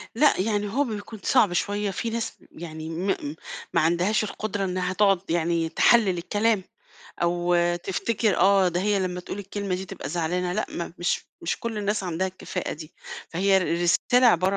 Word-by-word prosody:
لأ، 295 -1 +4
يعني 205 0 0
هو 280 +4 +3
بيكون 220 -3 -6
صعب 215 -8 +4
شوية. 205 +2 0
في 230 +5 -3
ناس 230 0 -3 0.2
يعني 160 -1 -7
م 170 +4 -3
م 145 +1 -4 0.4
ما - - +4
عندهاش 175 +7 +2
القدرة 205 -1 -3
إنّها 185 0 -1
تقعد 195 -2 +3
يعني 165 0 +1
تحلِّل 195 +2 +4
الكلام 210 +3 +1 0.6
أو 175 +1 +1 0.3
تفتكر 210 +1 0
آه، 195 0 +5
ده 175 +1 -1
هي 205 +1 +2
لمّا 180 -1 -2
تقول 185 - -7
الكلمة 200 -1 -3
دي 185 +1 -4
تبقى 190 -1 -7
زعلانة، 175 +1 -1
لأ، - - -1
ما 170 - -5
مش 175 - 0 0.2
مش 170 - -2
كل 230 -2 -3
الناس 205 0 0
عندها 180 +1 -1
الكفاءة 185 -1 -5
دي. 155 +1 -9 0.4
فهي 190 +3 +3
رسالة 180 +8 +3
عبارة 190 -2 +4
190 Hz, 175 wpm, -25 LUFS, 175-210 Hz, 0.6 s, آه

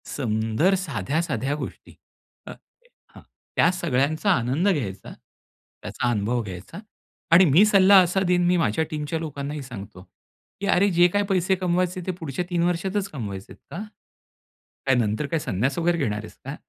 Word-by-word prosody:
सुंदर 115 - +1
साध्या-साध्या 145 - -2
गोष्टी. 150 - -8 0.5
अ, - - -6 0.6
हां, - - -12 0.3
त्या 170 - +4
सगळ्यांचा 155 +2 0
आनंद 135 - +1
घ्यायचा, 120 - -3
त्याचा 120 - -8
अनुभव 115 +3 0
घ्यायचा 95 - -9 0.5
आणि 175 +3 +8
मी 165 +7 +6
सल्ला 200 -1 +6
असा 180 +2 0
देईन, 175 0 +2
मी 180 0 +3
माझ्या 130 -1 +1
टीमच्या 155 +1 -3
लोकांनाही 145 -2 -5
सांगतो 100 -7 -10
की, 200 - -14
"अरे 200 +2 +3
जे 175 +1 +6
काही 205 0 +1
पैसे 190 0 +2
कमवायचे 180 +1 0
ते 185 - +1
पुढच्या 160 +2 -4
3 170 -1 0
वर्षातच 190 +3 -1
कमवायचेत, 100 -8 -7 0.2
का? 195 - -5 1.0
काय 135 -1 +3
नंतर 110 +3 0
काय 160 +3 -1
संन्यास 130 +2 -1
वगैरे 170 0 +1
घेणार 110 -9 -1
आहेस 110 0 -11
का? 135 +2 -5
155 Hz, 150 wpm, -24 LUFS, 120-180 Hz, 1.0 s, आणि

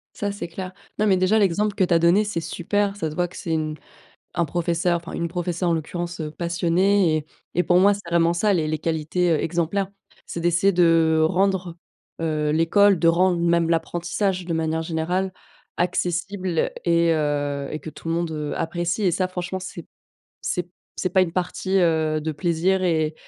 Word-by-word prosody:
Ça, 205 -1 -2
c'est 200 -4 -6
clair. 185 +2 -6 0.3
Non 215 - +2
mais, 190 -2 +4
déjà, 185 +4 +3
l'exemple 205 +1 +1
que 190 - +2
tu 175 - +2
as - - +5
donné, 175 +5 +4
c'est 205 -5 -2
super. 200 +5 -1
Ça 160 -6 -2
se - - -8
voit 175 +2 0
que 180 - -14
c'est 170 - -4
une 155 -1 -1 0.6
un 170 - +3
professeur, 170 +2 0
enfin, 170 - -9
une 170 0 -2
professeure, 175 0 -2
en - - +2
l'occurrence, 175 +2 -4
heu, 155 -1 -3
passionnée 170 +2 +2
et 150 - -5 0.3
et 180 - +2
pour 180 0 +4
moi, 200 +2 +5
c'est 195 -4 -8
vraiment 170 0 +3
ça 205 +5 +2
les 160 -4 +1
les 155 -1 -2
qualités, 165 +2 0
heu, 155 - +2
exemplaires. 175 +4 -1 0.4
C'est 170 - -5
d'essayer 175 +3 +3
de 165 -2 +4
rendre, 185 0 0 0.4
heu, 155 -2 0
l'école, 180 +5 +4
de 165 - +3
rendre 175 +1 +3
même 170 -1 +2
l'apprentissage, 175 +3 -1
de 170 - -2
manière 160 0 0
générale, 175 +4 -1 0.5
accessible 180 0 -1
et 170 -1 +3
heu, 145 -2 -1
et 155 - -4
que - - -8
tout 165 - -8
le - - +1
monde, 170 -1 -1
heu, 150 -1 -3
apprécie 175 +4 -2
et 185 - +3
ça, 185 +2 0
franchement, 185 +1 -4
c'est 175 -3 -7
p - - -32 0.5
c'est 180 - -1
p 175 - -29 0.3
c'est 185 - -1
pas 190 +1 +4
une 170 -3 0
partie, 185 +2 -1
heu, 160 -3 +2
de 155 +1 -3
plaisir 175 +4 +1
et 160 -3 +1
170 Hz, 200 wpm, -23 LUFS, 160-185 Hz, 0.6 s, as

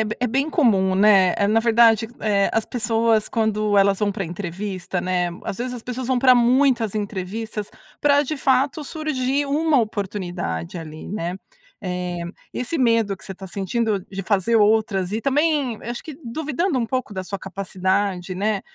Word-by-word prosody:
é - - -1 0.2
é 250 - +2
bem 270 +6 0
comum, 195 - +3
né. 195 -2 +5
Eh, 200 - +3
na 220 +2 +3
verdade, 225 -1 +4
eh, 200 -2 +2
as 225 - +1
pessoas 225 -2 +1
quando 215 -3 +1
elas 195 0 +3
vão 210 -1 +2
pra 195 0 -3
entrevista, 185 +1 -4
né, 180 -1 0 0.2
às - - -4
vezes 250 +3 -3
as 240 - -8
pessoas 250 +1 -5
vão 260 -1 +2
pra 255 0 +6
muitas 245 -2 +3
entrevistas 210 +1 -4 0.3
pra 285 0 +4
de 305 +3 -3
fato 270 +3 +1
surgir 285 -2 -1
uma 295 0 +2
oportunidade 185 - -4
ali, 155 -1 -9
né. 180 -3 -3 0.4
Eh, 180 -3 -3 0.3
e - - -4
esse 250 +7 -2
medo 230 -5 +2
que - - -16
você 195 - -7
tá 190 +1 -9
sentindo 200 +2 -1
de 195 0 -5
fazer 205 +3 +2
outras 210 -3 +2
e 220 - -1
também 280 -2 +1
acho 240 +1 -5
que 310 -4 -9
duvidando 310 +5 -1
um 235 - 0
pouco 255 -2 -3
da 190 0 -4
sua 195 +2 -5
capacidade, 190 -1 -2
né, 205 +1 0
215 Hz, 175 wpm, -22 LUFS, 190-250 Hz, 0.4 s, pra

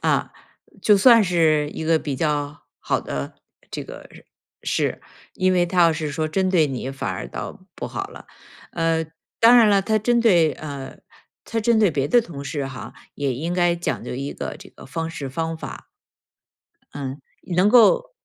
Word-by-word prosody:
啊， - - 0 0.5
就 210 -2 +5
算 230 +1 +7
是 155 -4 +2
一 160 - -6
个 160 0 +3
比 145 -3 -4
较 145 -1 -1 0.2
好 - - -1
的 70 0 -5 0.4
这 - - -5
个 - - -11 0.5
事。 - - -1 0.3
因 185 0 +2
为 180 -1 +3
他 180 +1 0
要 165 -1 +5
是 155 -1 -3
说 155 +2 -2
针 185 +3 0
对 170 -5 +4
你， 130 -1 -4
反 135 - -4
而 - - -5
倒 - - -7 0.2
不 - - -5
好 - - -4
了。 - - -13 0.5
呃， 165 -1 0 0.3
当 235 +2 +8
然 230 -3 +7
了， 200 -1 +4
他 215 +2 +1
针 235 +3 +2
对 175 -9 +4
呃， 140 -3 -8 0.5
他 225 0 -2
针 230 +1 +3
对 210 -4 +4
别 140 -2 -1
的 245 - +5
同 155 -10 -8
事 140 -1 -3
哈， 130 -3 -8 0.2
也 140 -2 -1
应 160 +8 -3
该 175 -1 +2
讲 175 - -3
究 - - -5
一 140 +2 -4
个 - - -6
这 - - -13
个 - - -15
方 165 +4 -4
式 145 -4 -6
方 165 +4 -3
法。 - - -9 1.1
嗯， 140 0 -6 0.4
能 185 +3 +5
够 480 - +5
165 Hz, 195 characters per minute, -22 LUFS, 145-195 Hz, 1.1 s, 当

